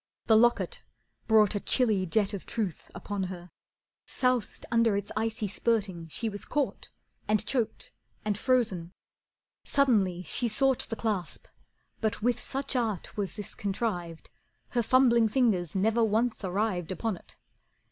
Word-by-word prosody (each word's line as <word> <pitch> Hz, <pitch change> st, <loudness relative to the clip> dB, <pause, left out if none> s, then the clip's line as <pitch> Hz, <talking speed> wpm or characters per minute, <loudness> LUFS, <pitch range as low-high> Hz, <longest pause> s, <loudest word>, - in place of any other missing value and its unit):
The 220 Hz, -, +5 dB
locket 240 Hz, -, +3 dB, 0.5 s
brought 215 Hz, -3 st, +5 dB
A 205 Hz, -, -1 dB
chilly 210 Hz, -5 st, +2 dB
jet 205 Hz, +3 st, +1 dB
of 200 Hz, -, -6 dB
truth 205 Hz, -8 st, -3 dB
upon 195 Hz, +2 st, -3 dB
her, 180 Hz, -1 st, -8 dB, 0.6 s
soused 250 Hz, -4 st, 0 dB
Under 230 Hz, -3 st, +3 dB
its 200 Hz, 0 st, -4 dB
icy 220 Hz, -1 st, -1 dB
spurting 195 Hz, -5 st, -1 dB
she 225 Hz, +8 st, -3 dB
was 205 Hz, -2 st, -5 dB
caught, 290 Hz, -2 st, -2 dB, 0.4 s
And 215 Hz, 0 st, +2 dB
choked, 235 Hz, -1 st, -2 dB, 0.3 s
and 210 Hz, -1 st, +1 dB
frozen. 205 Hz, -8 st, 0 dB, 0.7 s
Suddenly 205 Hz, -10 st, +2 dB
she 240 Hz, -, 0 dB
sought 265 Hz, +3 st, +1 dB
The 225 Hz, -, -2 dB
clasp, 210 Hz, -7 st, -3 dB, 0.5 s
but 220 Hz, 0 st, -1 dB
with 240 Hz, +2 st, +1 dB
such 270 Hz, 0 st, -3 dB
art 225 Hz, -7 st, -1 dB
was 200 Hz, -3 st, -3 dB
this 210 Hz, -, -5 dB
contrived 185 Hz, -5 st, -3 dB, 0.4 s
Her 240 Hz, -, +1 dB
fumbling 235 Hz, -1 st, +4 dB
fingers 210 Hz, -, +1 dB
never 220 Hz, +4 st, +2 dB
once 225 Hz, +1 st, +1 dB
arrived 185 Hz, -2 st, -1 dB
Upon 205 Hz, +3 st, -2 dB
it. -, -, -15 dB
215 Hz, 140 wpm, -29 LUFS, 190-235 Hz, 0.7 s, The